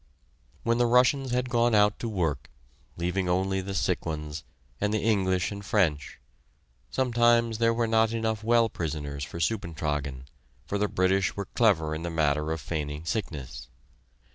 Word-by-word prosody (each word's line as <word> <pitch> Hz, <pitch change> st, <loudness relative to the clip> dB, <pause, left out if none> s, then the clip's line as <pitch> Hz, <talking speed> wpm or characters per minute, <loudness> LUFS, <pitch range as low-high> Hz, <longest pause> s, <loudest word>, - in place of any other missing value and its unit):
When 115 Hz, +1 st, +1 dB
the 120 Hz, -, +4 dB
Russians 125 Hz, +3 st, +3 dB
had 125 Hz, 0 st, -1 dB
gone 120 Hz, -1 st, +3 dB
out 105 Hz, 0 st, +3 dB
to 115 Hz, -, -3 dB
work, 85 Hz, -8 st, -2 dB, 0.5 s
leaving 90 Hz, +2 st, -1 dB
only 95 Hz, +1 st, +1 dB
the 95 Hz, +1 st, -5 dB
sick 90 Hz, +1 st, 0 dB
ones, 75 Hz, -1 st, -5 dB, 0.4 s
and 105 Hz, -, +1 dB
the 110 Hz, -, 0 dB
English 95 Hz, -4 st, +1 dB
and 100 Hz, 0 st, -7 dB
French, 85 Hz, -, 0 dB, 0.7 s
sometimes 120 Hz, -3 st, +2 dB
there 115 Hz, 0 st, +4 dB
were 115 Hz, 0 st, +1 dB
not 110 Hz, 0 st, +3 dB
enough 110 Hz, -1 st, -2 dB
well 115 Hz, 0 st, +4 dB
prisoners 75 Hz, -6 st, -4 dB
for 75 Hz, -, -7 dB
"Suppentragen," 75 Hz, -, -2 dB, 0.4 s
for 100 Hz, -, -2 dB
the 105 Hz, -, +2 dB
British 95 Hz, 0 st, +1 dB
were 100 Hz, -, -3 dB
clever 90 Hz, -9 st, +2 dB
in 80 Hz, -, -4 dB
the 85 Hz, -, -3 dB
matter 75 Hz, -1 st, 0 dB
of 80 Hz, -, -2 dB
feigning 75 Hz, 0 st, -4 dB
sickness. 75 Hz, -, -4 dB
95 Hz, 160 wpm, -27 LUFS, 80-115 Hz, 0.7 s, the